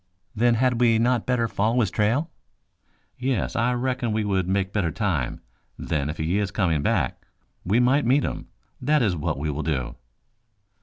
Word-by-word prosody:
"Then 120 Hz, +2 st, +3 dB
had 125 Hz, 0 st, +1 dB
we 115 Hz, -2 st, +4 dB
not 120 Hz, 0 st, +1 dB
better 125 Hz, -2 st, +1 dB
follow 110 Hz, +3 st, 0 dB
his 100 Hz, -5 st, 0 dB
trail?" 125 Hz, +10 st, 0 dB, 0.9 s
"Yes, 130 Hz, 0 st, -1 dB
I 120 Hz, +1 st, +1 dB
reckon 125 Hz, -1 st, -1 dB
we 110 Hz, 0 st, 0 dB
would 95 Hz, -3 st, 0 dB
make 95 Hz, 0 st, 0 dB
better 95 Hz, -6 st, +1 dB
time. 85 Hz, -, -2 dB, 0.4 s
Then, 75 Hz, -2 st, -2 dB
if 80 Hz, -, -5 dB
he 85 Hz, +6 st, 0 dB
is 100 Hz, -1 st, -1 dB
coming 85 Hz, -8 st, 0 dB
back, -, -, -1 dB, 0.4 s
we 100 Hz, +6 st, +2 dB
might 130 Hz, +4 st, +3 dB
meet 135 Hz, +2 st, +3 dB
him. -, -, -4 dB, 0.3 s
That 150 Hz, +1 st, +2 dB
is 100 Hz, -5 st, +1 dB
what 75 Hz, -, -2 dB
we 75 Hz, +2 st, -2 dB
will 75 Hz, +2 st, -3 dB
do." 65 Hz, -7 st, -2 dB
110 Hz, 175 wpm, -24 LUFS, 90-125 Hz, 0.9 s, we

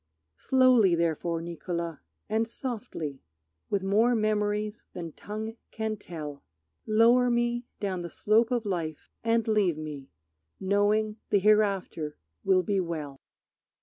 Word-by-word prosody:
Slowly 255 Hz, -8 st, +5 dB
therefore, 165 Hz, 0 st, 0 dB
Niccolo, 170 Hz, -1 st, -4 dB, 0.3 s
and 225 Hz, +1 st, +1 dB
softly, 225 Hz, -, -5 dB, 0.5 s
With 200 Hz, -2 st, 0 dB
more 220 Hz, +5 st, +3 dB
memories 210 Hz, -1 st, 0 dB
than 170 Hz, -3 st, -6 dB
tongue 220 Hz, +6 st, -6 dB
can 220 Hz, -1 st, -2 dB
tell, 155 Hz, -7 st, -7 dB, 0.5 s
Lower 235 Hz, +3 st, +5 dB
me 240 Hz, 0 st, 0 dB
down 190 Hz, -3 st, -2 dB
the 170 Hz, -, -5 dB
slope 220 Hz, +7 st, +3 dB
of 240 Hz, -3 st, 0 dB
life, 165 Hz, -6 st, -3 dB
and 230 Hz, 0 st, +2 dB
leave 205 Hz, -7 st, +2 dB
me 150 Hz, -3 st, -7 dB, 0.5 s
Knowing 205 Hz, +2 st, +2 dB
the -, -, +4 dB
hereafter 195 Hz, -7 st, +2 dB, 0.3 s
will 185 Hz, -1 st, +4 dB
be 200 Hz, -1 st, +1 dB
well. 155 Hz, -6 st, -4 dB
205 Hz, 120 wpm, -28 LUFS, 170-220 Hz, 0.5 s, Slowly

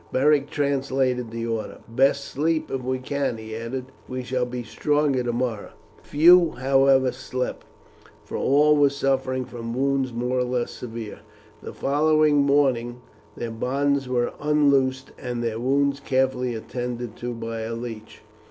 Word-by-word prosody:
Beric 145 Hz, +1 st, +3 dB
translated 135 Hz, -4 st, 0 dB
the 115 Hz, 0 st, -4 dB
order. 115 Hz, -2 st, -3 dB
"Best 135 Hz, +4 st, +2 dB
sleep, 155 Hz, +3 st, -1 dB
if 135 Hz, -, -2 dB
we 130 Hz, +1 st, -1 dB
can," 135 Hz, -1 st, -2 dB
he 110 Hz, 0 st, -7 dB
added. 125 Hz, +3 st, -5 dB, 0.2 s
"We 130 Hz, 0 st, -4 dB
shall 125 Hz, 0 st, -1 dB
be 125 Hz, 0 st, -5 dB
stronger 145 Hz, +1 st, +1 dB
tomorrow." 120 Hz, -2 st, -2 dB, 0.3 s
Few, 170 Hz, +3 st, +5 dB
however, 135 Hz, 0 st, +3 dB
slept, 125 Hz, 0 st, -5 dB, 0.6 s
for -, -, -7 dB
all 150 Hz, +2 st, +4 dB
were 145 Hz, -1 st, +5 dB
suffering 135 Hz, -2 st, -1 dB
from 115 Hz, -1 st, -6 dB
wounds 135 Hz, 0 st, 0 dB
more 125 Hz, +2 st, -1 dB
or -, -, +2 dB
less 125 Hz, -1 st, -2 dB
severe. 115 Hz, -3 st, -7 dB, 0.4 s
The -, -, -7 dB
following 155 Hz, +1 st, +3 dB
morning 135 Hz, -4 st, +2 dB, 0.4 s
their 120 Hz, -1 st, -4 dB
bonds 135 Hz, +3 st, 0 dB
were 120 Hz, -1 st, 0 dB
unloosed, 140 Hz, -3 st, +2 dB
and 120 Hz, -2 st, -4 dB
their 115 Hz, -1 st, -2 dB
wounds 140 Hz, +3 st, +1 dB
carefully 130 Hz, -3 st, 0 dB
attended 120 Hz, 0 st, -5 dB
to 120 Hz, 0 st, -4 dB
by 115 Hz, 0 st, -5 dB
a 110 Hz, +1 st, -4 dB
leech. 115 Hz, -2 st, -8 dB
130 Hz, 145 wpm, -24 LUFS, 120-140 Hz, 0.6 s, Few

